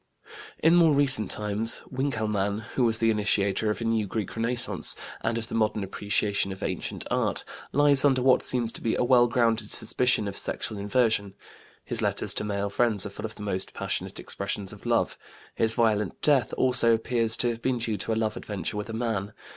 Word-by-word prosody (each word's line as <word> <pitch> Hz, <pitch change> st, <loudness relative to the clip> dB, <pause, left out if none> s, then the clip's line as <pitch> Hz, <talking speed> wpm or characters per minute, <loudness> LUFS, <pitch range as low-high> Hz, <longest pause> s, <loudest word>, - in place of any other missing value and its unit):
In 165 Hz, -, +5 dB
more 165 Hz, -4 st, +5 dB
recent 130 Hz, -8 st, +4 dB
times 105 Hz, +2 st, 0 dB
Winkelmann, 110 Hz, -6 st, -2 dB
who 130 Hz, -, +1 dB
was 115 Hz, -2 st, +3 dB
the 115 Hz, 0 st, +2 dB
initiator 105 Hz, 0 st, 0 dB
of 105 Hz, -, -3 dB
a -, -, -2 dB
new 115 Hz, -2 st, 0 dB
Greek 105 Hz, 0 st, -4 dB
Renaissance 115 Hz, +1 st, +2 dB, 0.3 s
and 115 Hz, -, -1 dB
of 115 Hz, 0 st, -4 dB
the -, -, -9 dB
modern 110 Hz, -2 st, 0 dB
appreciation 100 Hz, 0 st, -1 dB
of 95 Hz, -, -8 dB
ancient -, -, -4 dB
art, -, -, 0 dB, 0.3 s
lies 145 Hz, -1 st, +4 dB
under 130 Hz, -3 st, +3 dB
what 130 Hz, -1 st, +4 dB
seems 120 Hz, -3 st, 0 dB
to -, -, -5 dB
be 115 Hz, -, 0 dB
a -, -, 0 dB
well 120 Hz, -1 st, +4 dB
grounded 115 Hz, -2 st, 0 dB
suspicion 120 Hz, -1 st, +1 dB
of 100 Hz, -, -5 dB
sexual 110 Hz, 0 st, -3 dB
inversion. 105 Hz, -1 st, 0 dB, 0.5 s
His -, -, -1 dB
letters -, -, +2 dB
to -, -, 0 dB
male 100 Hz, -1 st, -3 dB
friends 110 Hz, -2 st, +2 dB
are 105 Hz, -, -6 dB
full 105 Hz, +2 st, -7 dB
of 110 Hz, 0 st, -7 dB
the 105 Hz, -, -9 dB
most 95 Hz, -2 st, -3 dB
passionate -, -, -3 dB
expressions 100 Hz, 0 st, -4 dB
of -, -, -11 dB
love. -, -, 0 dB, 0.3 s
His 110 Hz, 0 st, +2 dB
violent 110 Hz, -4 st, 0 dB
death 135 Hz, -7 st, +2 dB
also 125 Hz, -3 st, +3 dB
appears 115 Hz, 0 st, +2 dB
to 120 Hz, -, +1 dB
have 115 Hz, -1 st, -5 dB
been 130 Hz, 0 st, 0 dB
due 115 Hz, -2 st, -2 dB
to 100 Hz, -, -3 dB
a -, -, +1 dB
love 110 Hz, -1 st, -1 dB
adventure 105 Hz, 0 st, -4 dB
with 105 Hz, +2 st, -5 dB
a -, -, -5 dB
man. 110 Hz, -3 st, -3 dB
110 Hz, 200 wpm, -26 LUFS, 105-120 Hz, 0.5 s, In